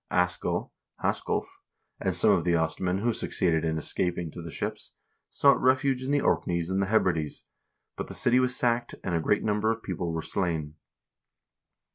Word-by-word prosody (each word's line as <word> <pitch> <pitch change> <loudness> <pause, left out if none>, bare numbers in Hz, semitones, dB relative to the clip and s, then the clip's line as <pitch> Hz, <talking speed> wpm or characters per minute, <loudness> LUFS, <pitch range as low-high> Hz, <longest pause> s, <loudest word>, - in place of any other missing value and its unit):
Askell 90 0 0 0.3
(Hasculf) - - 0 0.5
and - - -1
some - - +4
of 95 -4 +3
the 85 0 +2
Ostmen 90 +3 0
who 120 0 +2
suc - - -2
ceeded 80 -3 +1
in 80 -1 0
escaping 85 +1 -1
to 85 - -8
the 85 - -7
ships - - -4 0.4
sought 140 -1 +4
refuge 130 0 +2
in 130 - -4
the 145 0 +2
Orkneys 85 0 0
and 95 +1 +1
the 95 - 0
Hebrides, 85 -8 0 0.5
but - - -5
the - - -6
city 125 +1 +3
was 125 0 +2
sacked, 120 -1 0
and 90 - -2
a 85 - +1
great 105 - +1
number 105 +1 +1
of 115 0 -4
people 90 -2 -3
were 80 -1 -3
slain. 80 -5 -2
90 Hz, 180 wpm, -27 LUFS, 85-115 Hz, 0.5 s, some